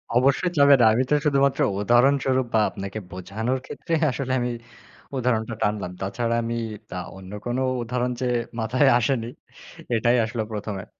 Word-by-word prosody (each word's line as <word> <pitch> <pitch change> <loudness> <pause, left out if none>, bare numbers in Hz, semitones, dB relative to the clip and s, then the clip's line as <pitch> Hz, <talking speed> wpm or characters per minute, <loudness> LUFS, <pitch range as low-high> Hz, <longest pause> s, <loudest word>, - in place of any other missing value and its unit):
অবশ্যই, 140 +8 +3
চাবে 140 0 +7 0.2
আমি 125 +3 +2
তো - - +2
শুধুমাত্র 140 -2 +2 0.2
উদাহরণস্বরূপ 130 +3 +3
বা 110 - +4
আপনাকে 100 +2 -6
বোঝানোর 110 +8 -3
ক্ষেত্রে 170 - -6 0.2
আসলে 130 +1 -4
আমি 120 0 -1 0.7
উদাহরণটা 115 -2 0
টানলাম। 105 -3 -1
তাছাড়া 115 +5 -1
আমি 115 +1 -2 0.3
তা - - -7 0.2
অন্য 95 0 -11
কোন 120 +1 -1 0.3
উদাহরণ 125 +1 -1
যে - - 0 0.3
মাথায় 130 +5 +2
আসেনি 120 -2 0 0.7
এটাই 120 +2 +3
আসলো 115 0 -3
১ম 105 0 -4
এ - - -13
120 Hz, 145 wpm, -24 LUFS, 110-130 Hz, 0.7 s, চাবে